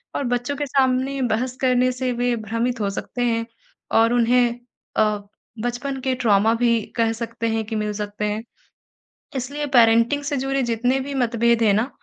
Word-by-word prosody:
और -, -, -1 dB
बच्चों 245 Hz, +4 st, -2 dB
के 290 Hz, -, -2 dB
सामने 265 Hz, 0 st, +1 dB
बहस 250 Hz, +3 st, -2 dB
करने 255 Hz, 0 st, +3 dB
से 255 Hz, 0 st, -2 dB
वे 245 Hz, 0 st, 0 dB
भ्रमित 230 Hz, +2 st, -2 dB
हो 200 Hz, -, 0 dB
सकते 220 Hz, +5 st, -5 dB
हैं 230 Hz, -1 st, 0 dB, 0.6 s
और 230 Hz, +1 st, +3 dB
उन्हें 240 Hz, 0 st, +3 dB, 0.4 s
अ, 210 Hz, -1 st, +2 dB, 0.5 s
बचपन 255 Hz, +3 st, -3 dB
के 260 Hz, 0 st, 0 dB
ट्रॉमा 220 Hz, -2 st, +3 dB
भी 235 Hz, -1 st, +2 dB, 0.2 s
कह 225 Hz, -1 st, +2 dB
सकते 230 Hz, 0 st, -4 dB
हैं 220 Hz, -, -1 dB
कि 220 Hz, +1 st, -5 dB
मिल 210 Hz, -1 st, -1 dB
सकते 210 Hz, 0 st, -4 dB
हैं। 210 Hz, +2 st, -2 dB, 0.9 s
इसलिए 285 Hz, +4 st, -3 dB
पेरेंटिंग 230 Hz, +4 st, +4 dB
से 285 Hz, -1 st, -2 dB
जुड़े 270 Hz, +1 st, 0 dB
जितने 245 Hz, +3 st, +1 dB
भी 280 Hz, +2 st, -5 dB
मतभेद 235 Hz, 0 st, +2 dB
हैं 210 Hz, -2 st, +4 dB
ना 220 Hz, +6 st, +1 dB
240 Hz, 175 wpm, -22 LUFS, 225-255 Hz, 0.9 s, पेरेंटिंग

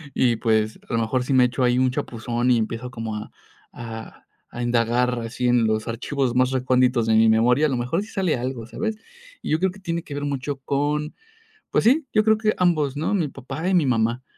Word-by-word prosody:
Y 120 Hz, -3 st, +2 dB
pues, 110 Hz, -2 st, 0 dB
a -, -, -4 dB
lo 115 Hz, -, +2 dB
mejor 125 Hz, +3 st, 0 dB
sí 135 Hz, -, -1 dB
me 130 Hz, -1 st, +6 dB
echo 125 Hz, +2 st, -1 dB
ahí 125 Hz, 0 st, +3 dB
un 130 Hz, -1 st, +2 dB
chapuzón, 120 Hz, 0 st, -2 dB
y 120 Hz, -, +4 dB
empiezo 115 Hz, +3 st, -3 dB
como 115 Hz, -3 st, -5 dB
a 105 Hz, -, -7 dB, 0.4 s
a 115 Hz, -2 st, -9 dB, 0.3 s
a 120 Hz, -, -4 dB
indagar 120 Hz, +1 st, +1 dB
así 120 Hz, +2 st, -3 dB
en 120 Hz, -2 st, +3 dB
los 110 Hz, +1 st, 0 dB
archivos 125 Hz, +2 st, -2 dB
más 130 Hz, +1 st, +3 dB
reconditos 125 Hz, -2 st, +2 dB
de 110 Hz, -, +3 dB
mi 110 Hz, 0 st, +5 dB
memoria. 120 Hz, +6 st, +4 dB
A -, -, +2 dB
lo 130 Hz, -, -1 dB
mejor 145 Hz, +11 st, -1 dB
sí -, -, -12 dB
sale 185 Hz, -, 0 dB
algo, 120 Hz, -2 st, -4 dB
¿sabes? 220 Hz, -, -3 dB, 0.4 s
Y -, -, -6 dB
yo 155 Hz, -, +3 dB
creo 190 Hz, +1 st, +1 dB
que 195 Hz, -, -14 dB
tiene 170 Hz, -3 st, -3 dB
que 145 Hz, -, -9 dB
ver 145 Hz, 0 st, -3 dB
mucho 140 Hz, 0 st, -3 dB
con 145 Hz, +3 st, -2 dB, 0.5 s
pues -, -, +1 dB
sí, 275 Hz, +5 st, +4 dB
yo 215 Hz, -, +4 dB
creo 220 Hz, 0 st, +4 dB
que 215 Hz, -1 st, +1 dB
ambos, 155 Hz, -6 st, +1 dB
¿no? 160 Hz, +7 st, -1 dB
Mi 170 Hz, -7 st, +1 dB
papá 135 Hz, +5 st, -6 dB
y -, -, +1 dB
mi 175 Hz, -5 st, +4 dB
mamá, 120 Hz, 0 st, 0 dB
125 Hz, 230 wpm, -23 LUFS, 115-150 Hz, 0.5 s, me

